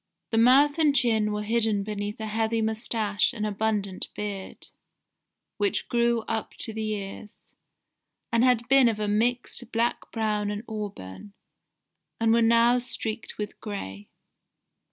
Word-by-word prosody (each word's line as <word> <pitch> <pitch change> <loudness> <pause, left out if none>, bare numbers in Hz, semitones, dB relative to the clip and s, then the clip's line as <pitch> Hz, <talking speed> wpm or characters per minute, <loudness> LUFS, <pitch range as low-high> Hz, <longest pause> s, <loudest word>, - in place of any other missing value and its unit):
The 225 - +2
mouth 280 +6 +5
and 300 -3 +4
chin 220 -5 +2
were 210 0 -2
hidden 220 -2 +1
beneath 205 0 -4
a 220 - -4
heavy 225 +1 0
moustache 220 -1 0
and 215 -2 -3
abundant 205 -2 -2
beard, 200 -2 -6 0.9
which 405 -3 0
grew 235 -1 +2
up 220 0 -4
to 225 - -4
the 215 -1 -2
ears, 200 +1 -8 0.9
and 235 0 +3
had 245 -2 +3
been 270 -1 +6
of 215 -2 -3
a 210 - -1
mixed 235 +3 -1
black 235 +1 -1
brown 210 -2 -1
and 205 +1 -4
auburn, 200 - -7 0.9
and 225 0 +3
were 235 - +4
now 235 +2 +4
streaked 230 -2 -3
with 210 0 -6
gray. 105 - -7
220 Hz, 140 wpm, -26 LUFS, 210-235 Hz, 0.9 s, been